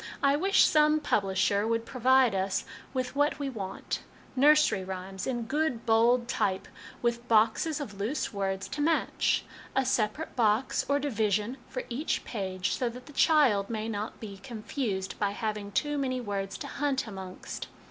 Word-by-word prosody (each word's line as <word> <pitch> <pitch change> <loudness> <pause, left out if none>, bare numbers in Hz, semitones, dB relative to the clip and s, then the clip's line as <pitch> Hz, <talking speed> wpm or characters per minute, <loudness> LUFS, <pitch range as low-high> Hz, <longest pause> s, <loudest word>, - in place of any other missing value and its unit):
I 275 0 +5
wish 390 +6 +4
some 305 0 +4
publisher 200 -4 +1
would 230 0 0
provide 255 -1 +4
us 190 0 -1 0.3
with 255 0 -3
what 290 +1 +2
we 280 -2 -3
want 195 -5 -4 0.3
nursery 295 -7 +5
rhymes, 190 0 -5
in 240 -3 -1
good 275 -1 -1
bold 235 +1 +4
type, 190 -6 -1 0.4
with 235 0 0
boxes 230 +8 +3
of 210 -9 -7
loose 255 +7 -2
words 195 -1 -2
to 295 - -3
match 325 +2 +1 0.3
a 270 0 +2
separate 250 +5 -1
box, 225 +2 +2
or 285 - +4
division, 220 -3 0
for 255 - -4
each 255 +6 -2
page, 190 -4 -2
so 245 - 0
that 250 +2 -10
the 295 - -13
child 265 -11 +4
may 220 -1 -3
not 215 0 -4
be 200 -3 -8
confused 215 -3 -4
by 200 -1 +1
having 210 -2 -3
too 295 +7 0
many 255 -2 -1
words 200 -4 -3
to - - -6
hunt 280 -2 -1
amongst. 190 -4 -7
230 Hz, 160 wpm, -29 LUFS, 200-270 Hz, 0.4 s, I